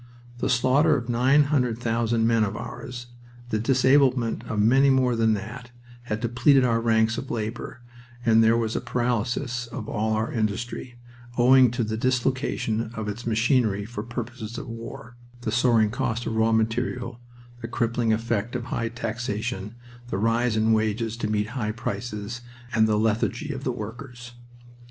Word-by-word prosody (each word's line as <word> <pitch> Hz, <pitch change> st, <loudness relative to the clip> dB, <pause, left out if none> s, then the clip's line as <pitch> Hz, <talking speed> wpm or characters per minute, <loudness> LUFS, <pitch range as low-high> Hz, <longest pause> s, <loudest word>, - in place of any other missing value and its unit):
The 130 Hz, -, -1 dB
slaughter 135 Hz, +5 st, +3 dB
of 120 Hz, -2 st, -6 dB
900,000 120 Hz, -3 st, +2 dB
men 115 Hz, -1 st, +3 dB
of 100 Hz, -, -2 dB
ours, 120 Hz, +1 st, -7 dB, 0.4 s
the 110 Hz, -, 0 dB
disablement 130 Hz, -1 st, +3 dB
of 105 Hz, -, -3 dB
many 130 Hz, +6 st, +5 dB
more 130 Hz, -2 st, +3 dB
than 110 Hz, -1 st, +3 dB
that, 115 Hz, +4 st, -7 dB, 0.4 s
had 110 Hz, -2 st, -3 dB
depleted 125 Hz, +3 st, +4 dB
our 115 Hz, -2 st, +2 dB
ranks 110 Hz, 0 st, +2 dB
of 135 Hz, -, -8 dB
labor, 115 Hz, +2 st, -4 dB, 0.4 s
and 115 Hz, -1 st, +5 dB
there 115 Hz, +1 st, +4 dB
was 115 Hz, -1 st, -1 dB
a -, -, -1 dB
paralysis 125 Hz, +1 st, -1 dB
of 115 Hz, -2 st, -7 dB
all 110 Hz, 0 st, -1 dB
our 110 Hz, +1 st, -1 dB
industry, 115 Hz, +3 st, -3 dB, 0.4 s
owing 130 Hz, +1 st, +6 dB
to 120 Hz, +1 st, -1 dB
the 110 Hz, 0 st, -3 dB
dislocation 125 Hz, -2 st, 0 dB
of 110 Hz, -1 st, -4 dB
its 110 Hz, +4 st, -5 dB
machinery 110 Hz, -3 st, +2 dB
for 115 Hz, -1 st, -6 dB
purposes 120 Hz, 0 st, -6 dB
of 140 Hz, -, -6 dB
war, 115 Hz, +1 st, -9 dB, 0.2 s
the 110 Hz, -, -2 dB
soaring 115 Hz, -2 st, +3 dB
cost 120 Hz, -1 st, -2 dB
of 110 Hz, -, -2 dB
raw 110 Hz, 0 st, +3 dB
material, 120 Hz, +2 st, -1 dB, 0.4 s
the 115 Hz, -, -4 dB
crippling 115 Hz, 0 st, 0 dB
effect 115 Hz, +1 st, -1 dB
of 125 Hz, -, -2 dB
high 115 Hz, -2 st, -2 dB
taxation, 110 Hz, -2 st, -4 dB, 0.3 s
the 95 Hz, -, -2 dB
rise 115 Hz, +2 st, +1 dB
in 110 Hz, +1 st, +3 dB
wages 110 Hz, +1 st, 0 dB
to 115 Hz, -, -2 dB
meet 105 Hz, 0 st, 0 dB
high 110 Hz, -4 st, -2 dB
prices, 115 Hz, 0 st, -5 dB, 0.3 s
and 110 Hz, -1 st, +4 dB
the 105 Hz, -1 st, +2 dB
lethargy 115 Hz, +7 st, 0 dB
of 135 Hz, 0 st, -7 dB
the 130 Hz, -, 0 dB
workers. 120 Hz, +2 st, -8 dB
115 Hz, 160 wpm, -25 LUFS, 110-125 Hz, 0.4 s, owing